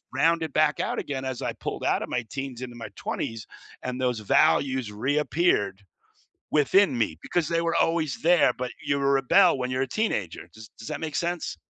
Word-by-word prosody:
rounded 165 -3 +2
back 155 -1 +2
out - - -1
again 135 -2 -4
as 130 -2 -4
I - - -2
pulled - - -5
out - - +2
of - - -7
my 125 -1 -2
teens 135 -3 -5
into 120 -1 -8
my 115 -3 -7
20s, 115 -2 -4 0.4
and 125 0 -4
those 125 -3 0
values 130 +2 +2
reappeared 130 - +1 0.7
within 150 0 +4
me 95 -8 0
because 170 -3 -1
they 165 0 +1
were 165 0 0
always 160 -5 +1
there, 175 +1 +5
but 125 0 -4
you 140 - +1
rebel 140 +6 +4
when 125 0 -2
you're 130 +1 -1
a - - 0
teenager, 105 - -2
does 110 -1 -12
does 115 - -10
that - - -4
make 155 -2 -4
sense? 170 - -2
135 Hz, 190 wpm, -26 LUFS, 120-165 Hz, 0.7 s, there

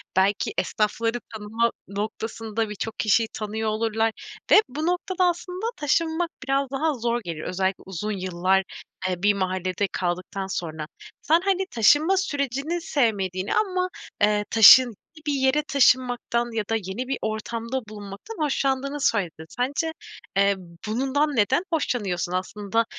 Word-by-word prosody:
belki 195 +2 +2
esnafları 225 +2 0 0.2
tanıma 220 +2 0 0.2
noktasında 220 +2 -3
birçok 215 +2 -5
kişiyi 220 +1 +3
tanıyor 220 +1 -3
olurlar 225 +1 +1 0.4
ve 425 - +9
bu 305 +5 -3
noktada 365 +1 0
aslında 360 +3 -2
taşınmak 320 +3 +1
biraz 275 0 0
daha 300 +3 +1
zor 235 -1 -1
gelir. 165 -3 -5
Özellikle 190 +1 -1
uzun 195 +3 -4
yıllar, 185 0 +1 0.5
eee, 180 +1 -3
bir 205 0 +5
mahallede 185 0 -1
kaldıktan 185 +2 -3
sonra. 160 -4 -4 0.3
Sen, 330 +3 +3
hani, 385 -1 +2
taşınma 295 - +4
sürecini 290 -1 -1
sevmediğini 200 - 0
ama, 370 -3 +1 0.3
eee, 210 0 +3
taşın 235 +2 +9 0.2
gi 310 - -15
bir 290 - +2
yere 265 +2 +2
taşınmaktan 245 -3 +2
ya 220 - 0
da 225 - +2
yeni 215 +4 -4
bir 270 - -1
ortamda 230 +3 -3
bulunmaktan 205 - -9
hoşlandığını 275 0 0
söyledin. 180 -11 0
Sence, 280 +6 -1 0.5
eee, 200 0 +4 0.3
bundan 270 +5 0
neden 210 - +3
hoşlanıyorsun? 195 - -1
Aslında, 205 +4 -1
225 Hz, 135 wpm, -25 LUFS, 200-280 Hz, 0.5 s, ve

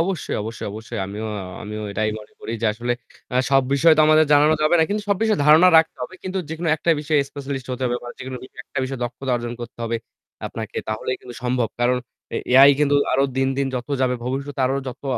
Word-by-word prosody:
অবশ্যই, 175 -1 -1
অবশ্যই, 110 +2 -6
অবশ্যই। 110 +1 -7
আমিও 105 +3 -5 0.4
আমিও 105 +1 -6
এটাই 110 +1 0
মনে 105 - -14
করি - - -5
যে - - +3
আসলে 120 +3 -2 0.4
আ - - +3
সব 135 -1 +5
বিষয় 160 +4 +5
তো - - +4
আমাদের 155 0 +5
জানানো 150 +2 +5
যাবে 155 +3 +4
না। 160 - +5
কিন্তু 210 +1 -1
সব 200 - +3
বিষয়ে 220 -2 +2
ধারণা 160 +4 +8
রাখতে 160 - +1
হবে। 125 - -6
কিন্তু 185 0 -3
যেকোনো 160 +1 -3
একটা 170 - 0
বিষয়ে 150 -1 +2
স্পেশালিস্ট 140 -2 -5
হতে 125 - -5
হবে 120 0 0
বা 120 - -8
যেকোনো 130 0 -6 0.3
একটা - - -6
বিষয়ে 130 -1 -5
দক্ষতা 125 +2 -3
অর্জন 120 0 -4
করতে 120 0 -9
হবে 115 0 -1 0.5
আপনাকে। - - -7
তাহলেই 110 +4 -2
কিন্তু 125 - -10
সম্ভব। 125 -2 0
কারণ 125 +1 +3 0.4
এ - - 0 0.2
AI 135 +2 +9
কিন্তু 145 -1 +3 0.2
আরো 135 +2 +3
দিন, 135 0 +2
দিন 140 - +1
যত 125 +2 -4
যাবে 130 -1 +2
ভবিষ্যতে 135 +2 -3
আরো 135 - 0
যত 125 +3 -9
135 Hz, 220 wpm, -22 LUFS, 120-155 Hz, 0.5 s, AI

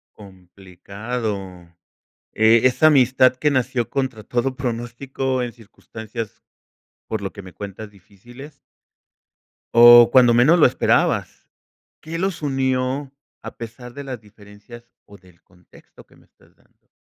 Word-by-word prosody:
Complicado, 100 +3 -7 1.0
eh, 110 +1 +4
esa 130 +5 +4
amistad 130 -2 +4
que 150 - +1
nació 130 -3 -1
contra 130 -6 -4
todo 125 +4 -2
pronóstico 130 +1 -4
en 120 -2 -5
circunstancias, 110 0 -10 0.6
por 110 -2 -4
lo 95 - -5
que 100 - -10
me 95 -1 -14
cuentas, 100 +1 -9
difíciles. 120 - -16 1.2
O 120 0 +8
cuando 125 -2 +5
menos 145 +9 +4
lo - - +6
esperabas. 125 - 0 0.5
¿Qué 165 +1 -7
los 185 -2 -3
unió 135 0 -2 0.3
a - - -10
pesar 120 +1 -10
de 140 0 -9
las 130 -4 -7
diferencias 105 +3 -16 0.2
o 100 - -16
del 90 -2 -24
contexto 90 -1 -21
que - - -25
me - - -24
estás - - -29
dando? - - -36
120 Hz, 130 wpm, -20 LUFS, 105-130 Hz, 1.2 s, O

